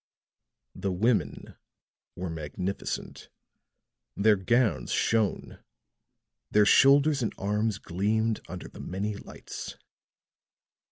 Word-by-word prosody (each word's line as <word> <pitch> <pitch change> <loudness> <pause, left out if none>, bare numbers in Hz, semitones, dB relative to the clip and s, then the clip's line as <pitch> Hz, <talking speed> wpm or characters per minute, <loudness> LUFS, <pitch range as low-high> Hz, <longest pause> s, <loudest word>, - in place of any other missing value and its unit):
The 100 - -3
women 95 - 0 0.6
were 90 -1 -4
magnificent; 80 +5 -5 0.9
their 105 +1 +5
gowns 110 -1 +1
shone, 110 -3 0 0.9
their 105 0 +4
shoulders 140 +5 +5
and 115 - -2
arms 105 +1 0
gleamed 105 +4 0
under 90 +1 -7
the - - -13
many 100 +3 -3
lights. - - -9
105 Hz, 90 wpm, -28 LUFS, 95-115 Hz, 0.9 s, their